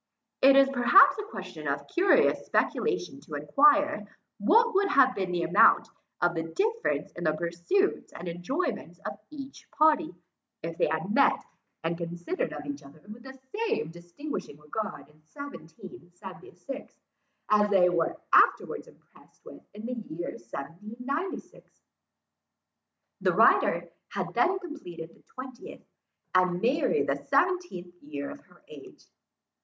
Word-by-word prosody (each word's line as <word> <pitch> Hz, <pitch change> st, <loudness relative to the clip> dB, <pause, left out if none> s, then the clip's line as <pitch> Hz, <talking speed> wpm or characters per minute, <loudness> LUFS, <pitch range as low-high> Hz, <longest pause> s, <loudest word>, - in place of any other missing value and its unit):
It 270 Hz, +1 st, +7 dB
is 275 Hz, 0 st, +7 dB
perhaps 275 Hz, -, +6 dB
a 415 Hz, 0 st, -6 dB
question -, -, -7 dB
of -, -, -2 dB
curious 365 Hz, +2 st, +3 dB
speculation 380 Hz, -9 st, -1 dB
to 155 Hz, -, -8 dB
enquire, 290 Hz, -, +3 dB, 0.3 s
what 460 Hz, -, +4 dB
would 395 Hz, +1 st, +3 dB
have 270 Hz, -8 st, +5 dB
been 190 Hz, -4 st, -3 dB
the 175 Hz, -1 st, -1 dB
amount 215 Hz, +6 st, +5 dB, 0.3 s
of 175 Hz, 0 st, +2 dB
the 165 Hz, -, -2 dB
difference 440 Hz, -, -1 dB
in 175 Hz, -, -8 dB
the 155 Hz, -, +3 dB
pursuits 170 Hz, -, -1 dB
and 175 Hz, -, -8 dB
enjoyments 175 Hz, -, -3 dB
of 200 Hz, -, -5 dB
each 275 Hz, -3 st, -10 dB
party, 310 Hz, -, +2 dB, 0.5 s
if 165 Hz, 0 st, -4 dB
they -, -, +3 dB
had 160 Hz, +6 st, -2 dB
met, 275 Hz, -, +3 dB, 0.4 s
and 165 Hz, +1 st, -2 dB
considered 175 Hz, -, -3 dB
each 285 Hz, 0 st, -6 dB
other 150 Hz, +3 st, -16 dB
with 240 Hz, -, -15 dB
the 265 Hz, +1 st, -12 dB, 0.2 s
same 450 Hz, -, -1 dB
distinguishing 175 Hz, -, -7 dB
regard 210 Hz, +9 st, -6 dB
in 150 Hz, +1 st, -25 dB
1776, 190 Hz, -, -10 dB, 0.6 s
as 210 Hz, 0 st, +4 dB
they 190 Hz, -3 st, +5 dB
were 170 Hz, -2 st, 0 dB, 0.2 s
afterwards -, -, +4 dB
impressed -, -, -22 dB
with -, -, -12 dB
in 215 Hz, +2 st, -8 dB
the 250 Hz, -, -3 dB
year 175 Hz, -8 st, -6 dB
1796. 215 Hz, -, -7 dB, 1.4 s
The -, -, +2 dB
writer -, -, +4 dB, 0.3 s
had -, -, -3 dB
then 380 Hz, +1 st, +2 dB
completed 180 Hz, -, -9 dB
the -, -, -23 dB
twentieth, 260 Hz, -, -9 dB, 0.5 s
and 185 Hz, -1 st, +3 dB
Mary 250 Hz, +9 st, +2 dB
the -, -, 0 dB
seventeenth 355 Hz, -, 0 dB
year 145 Hz, -1 st, -6 dB
of -, -, -10 dB
her -, -, -23 dB
age. -, -, -14 dB
215 Hz, 135 wpm, -28 LUFS, -, 1.4 s, It